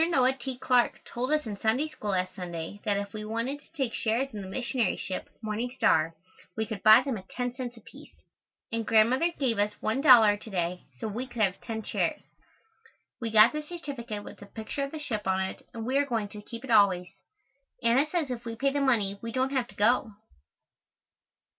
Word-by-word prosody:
Noah 265 -5 +4
T. 265 -1 -6
Clarke 250 -1 +2
told 250 +4 -3
us 305 -2 +2
in 205 -3 -5
Sunday 240 +8 +1
School 215 -9 -6
last 185 -1 0
Sunday 175 +2 -6
that 205 -2 +1
if 200 0 -4
we 215 -1 -5
wanted 230 +6 -3
to - - -25
take 265 -7 -2
shares 240 +5 0
in 210 - -5
the 190 - -7
missionary 245 +3 -1
ship, 185 - -5
Morning 220 +3 -2
Star, 160 +2 +3 0.4
we 220 - 0
could 220 -3 -6
buy 215 +5 +8
them 265 -4 -2
at 190 - -16
10 245 -1 -3
cents 245 -2 -6
apiece, 225 - -14 0.6
and 230 0 -1
Grandmother 245 +9 +4
gave 240 -6 0
us 210 0 +1
$1 220 -4 +6
to 220 - -10
day 180 -2 -2
so 220 - -4
we 235 +5 -4
could 240 -3 -1
have 185 -3 0
ten 220 -2 -5
shares. - - -1 1.0
We 230 -2 -2
got 220 0 +7
the 305 - -2
certificate 275 -10 -6
with - - -11
a 205 - -10
picture 220 +6 -5
of 275 - -3
the 315 - -5
ship 220 -10 -4
on 190 0 +2
it, 190 0 -3
and 225 -1 -6
we 265 +3 +2
are 285 - +2
going 225 -5 -1
to 210 0 -9
keep 230 +3 -9
it 265 - -5
always. 190 -4 +4 0.7
Anna 245 +6 +4
says 310 -4 -1
if 240 -1 -4
we 230 -1 -5
pay 275 +4 +1
the 285 - 0
money, 210 -7 +2
we 230 - -5
don't 260 +2 0
have 260 -3 0
to - - -16
go. 225 +2 +2
230 Hz, 210 wpm, -28 LUFS, 205-260 Hz, 1.0 s, buy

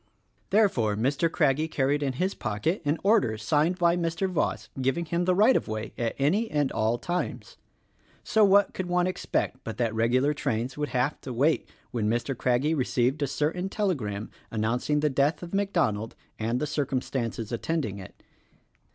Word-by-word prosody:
Therefore 155 - +3
Mr. 140 +9 +1
Craggie 150 -1 +2
carried 145 -1 0
in 135 -2 0
his 185 +9 -1
pocket 110 - -2
an 145 +3 +1
order 195 - +3
signed 150 - +1
by 170 -1 +3
Mr. 170 +2 -1
Voss 180 -5 -1
giving 135 +6 0
him 170 +2 -1
the 185 0 +3
right 215 +7 +5
of - - 0
way 110 0 -4
at 115 -1 -2
any 190 +12 +1
and 145 -2 0
all 110 +1 +1
times. 180 - -4 0.7
So 220 - +3
what 200 0 +5
could 185 - -4
one 180 0 +2
expect 185 -7 -1
but 110 - -6
that 115 -3 0
regular 125 +6 +2
trains 120 -2 -2
would 150 0 -2
have 130 +4 -1
to 130 - -6
wait 140 +7 +1 0.2
when 110 -4 0
Mr. 120 +4 -1
Craggie 125 +6 +1
received 130 -1 0
a 145 - +1
certain 155 +7 -1
telegram 120 - -2 0.2
announcing 120 +7 0
the 150 - +2
death 140 +6 +1
of 170 - -8
MacDonald 170 - 0 0.2
and 115 +3 0
the 150 - -1
circumstances 130 -6 -2
attending 120 -4 -2
it. 95 - -12
145 Hz, 170 wpm, -27 LUFS, 120-170 Hz, 0.7 s, right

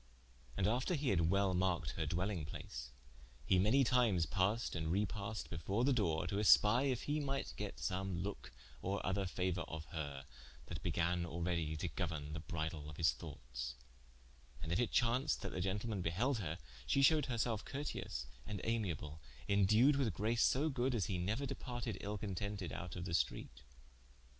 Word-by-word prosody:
And 95 - +2
after 125 - +2
he 145 -3 0
had 85 -4 +3
well 100 0 +3
marked 90 -1 +1
her - - -2
dwelling 90 -1 -1
place, 60 -4 -6 0.6
he 95 - +4
many 110 +9 +5
times 115 -9 +3
passed 100 +5 +1
and 80 -1 -1
repassed 105 +3 -2
before 95 +8 -1
the 140 +1 +4
doore, 85 -9 +1
to 95 +3 -2
espie 105 +5 +6
if 125 -2 -1
he 150 +1 0
might 135 - -2
get - - -4
some 95 -2 -1
loke 95 -8 -5 0.3
or 100 +2 -2
other 95 +1 +1
fauour 90 -1 -1
of 80 -1 -6
her, 70 -4 -4 0.4
that - - -6
began 85 +1 +1
already 85 -2 -1
to 90 - -2
gouerne 80 -5 -3
the 80 - -3
bridle 80 -2 -4
of 75 - -9
his 80 -4 +4
thoughtes, 60 0 -6 0.9
and 80 - -3
if 85 - +2
it 120 - +2
chaunced 125 +5 +2
that - - -2
the 90 - -3
gentleman 100 +2 -1
beheld 110 +10 +1
her, 80 -4 -3 0.3
she 135 - +3
shewed 150 0 +5
herselfe 115 -3 0
curteous 135 - -4 0.2
and 100 - -3
amiable, 85 -10 -2 0.3
indued 110 +8 +5
with 115 -10 +1
grace 115 +4 +1
so 145 +5 +4
good 130 -2 0
as 105 - +1
he 90 -2 -2
neuer 105 +10 0
departed 120 -6 -4
ill 105 +1 -3
contented 100 -2 -3
out 85 -2 -5
of 90 -1 -4
the 85 - -3
streate. - - -1
95 Hz, 175 wpm, -37 LUFS, 85-115 Hz, 0.9 s, espie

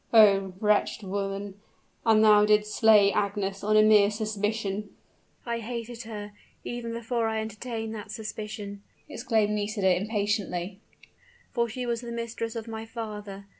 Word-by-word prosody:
"Oh, 195 -4 +6
wretched 210 -1 +1
woman, 195 0 -4 0.5
and 220 -1 +6
thou 210 -1 +7
didst 210 0 +3
slay 210 -3 +6
Agnes 200 -1 -1
on 215 +1 +3
a 215 - +7
mere 210 -2 +6
suspicion?" 210 -1 -2 0.6
"I 235 -1 -2
hated 235 +1 -6
her 210 -1 -6 0.3
even 240 -1 -5
before 230 0 -1
I 220 0 -1
entertained 220 +1 -5
that 210 -2 -7
suspicion," 210 -2 -6 0.3
exclaimed 220 -3 0
Nisida, 205 -3 +1
impatiently; 200 -2 -2 0.7
"for 235 -1 0
she 250 +3 -4
was 235 -1 -1
the 235 -1 -7
mistress 230 -1 -4
of 225 0 -5
my 220 -1 -5
father! 210 -3 -7
215 Hz, 140 wpm, -27 LUFS, 205-225 Hz, 0.7 s, thou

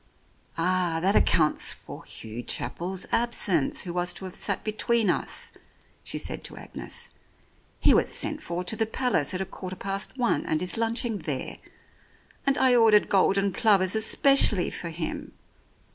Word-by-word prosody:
"Ah, 175 -1 0
that 195 +5 +1
accounts 155 -2 +3
for - - -12
Hugh 110 +2 -8
Chapel's 175 +11 -1
absence, 205 - +2
who 175 - -6
was 175 0 -1
to 190 - -7
have 185 - -8
sat - - 0
between 215 -1 +1
us," - - -3 0.5
she - - -1
said - - -3
to - - -4
Agnes. - - -4 0.7
"He - - +4
was - - +2
sent 305 0 -1
for 180 - -4
to 180 +5 0
the 225 0 -1
Palace 220 - 0
at 185 - -3
a - - -2
quarter 185 0 -8
past 195 +6 -4
one 245 -2 0
and 155 - 0
is 180 - +1
lunching 230 -1 -2
there. 150 -5 -4 0.9
And 275 +1 +2
I 255 -1 +4
ordered 220 -3 +4
golden 195 0 +2
plovers 200 -5 +3
especially 220 -3 +3
for 170 - -6
him. 160 0 -6
190 Hz, 160 wpm, -26 LUFS, 175-225 Hz, 0.9 s, He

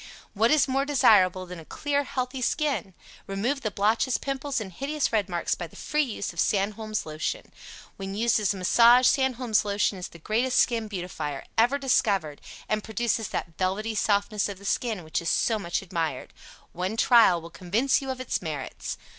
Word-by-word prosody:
WHAT 220 +3 +3
IS 305 -1 +4
MORE 270 +1 +1
DESIRABLE 200 -10 +4
THAN 180 -1 -9
A 160 - -12
CLEAR, 285 - -1
HEALTHY 255 -1 -3
SKIN? 265 - -1 0.3
Remove 230 +8 -1
the 215 - -1
blotches, 220 +5 +1
Pimples 275 0 -3
and 195 -4 -7
hideous 280 - -2
red 205 -3 +1
marks 175 -1 -1
by 175 - -5
the - - -19
free 300 - -1
use 220 -9 -3
of 170 - -9
SANDHOLM'S 215 +2 0
LOTION. 155 - -4 0.5
When 195 0 -5
used 230 +1 +2
as 205 -2 +1
a 200 - -4
massage, 235 +7 +5
Sandholm's 255 -4 +2
Lotion 200 -1 0
is 180 - -5
the - - -14
greatest 230 +9 0
skin 230 -3 +2
beautifier 175 -8 -5
ever 240 +5 +3
discovered, 200 - +1 0.3
and 215 -1 -1
produces 225 0 -1
that 165 - -5
velvety 200 +4 -1
softness 205 0 +1
of 200 - -6
the 200 - -14
skin 215 -3 -1
which 160 +2 -2
is 170 - -2
so 225 -2 +1
much 175 -1 -2
admired. 165 -7 -3 0.4
One 185 +5 -3
trial 230 -8 +5
will 165 +1 -11
convince 220 +13 +1
you 270 - -6
of 260 -1 -3
its 255 - -2
merits. 155 -6 -5
215 Hz, 185 wpm, -26 LUFS, 185-250 Hz, 0.5 s, massage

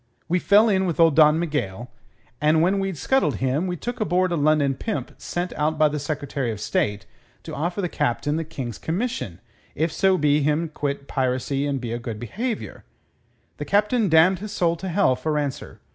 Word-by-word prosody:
We 180 +2 +1
fell 205 +5 +5
in 190 -3 +2
with 170 - -3
old 165 -3 +5
Don 155 0 +6
Miguel, 125 - -3 0.5
and 155 +2 +4
when 195 +3 +2
we'd 195 -3 -2
scuttled 165 - +1
him 130 - 0
we 180 - -2
took 245 +8 -5
aboard 185 -3 +1
a - - +1
London 150 -2 +2
pimp 215 - -4
sent 175 +1 -3
out 155 +1 -1
by 155 0 +4
the 150 0 -3
Secretary 145 -3 -3
of 110 -2 -4
State 105 -1 -1 0.4
to 160 - -8
offer 175 +7 -2
the - - +1
Captain 145 0 -1
the 165 - -1
King's 130 -7 -6
commission 160 - -3 0.4
if 160 +2 0
so 190 +3 +2
be 150 -1 +3
him'd 150 +2 0
quit 140 -1 -3
piracy 135 +2 -1
and 140 -1 -1
be 120 -2 -4
o' 120 - -3
good 115 -3 -6
behaviour. 220 - -4 0.7
The - - -5
Captain 210 +1 +2
damned 165 +3 +5
his 210 +1 -6
soul 170 -4 +1
to 190 +3 -5
hell 175 -7 +3
for 155 +3 -2
answer. 145 -2 -4
155 Hz, 195 wpm, -23 LUFS, 140-180 Hz, 0.7 s, Don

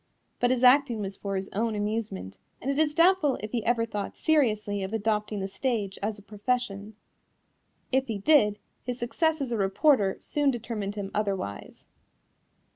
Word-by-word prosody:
But 245 - +3
his 255 0 +1
acting 250 -2 +5
was 195 -1 -4
for 195 0 -4
his 190 0 -2
own 225 +2 -1
amusement, 205 - -3 0.2
and 270 - -2
it 280 - -1
is 300 -1 +2
doubtful 335 -5 +4
if 215 0 -7
he 235 -3 -1
ever 230 0 +2
thought 205 -3 -5
seriously 215 -10 +1
of 190 +2 -4
adopting 210 -1 -1
the 195 - -2
stage 205 -2 -2
as 210 +1 -2
a 205 - -15
profession. 210 -1 -3 1.0
If 265 +1 +2
he 225 -3 -2
did, 210 -2 +4 0.3
his 250 -1 -4
success 315 +6 0
as 265 -3 -3
a 230 - 0
reporter 200 +1 +3
soon 290 -1 0
determined 225 -5 -3
him 200 -1 -5
otherwise. 195 - -3
220 Hz, 170 wpm, -27 LUFS, 200-255 Hz, 1.0 s, acting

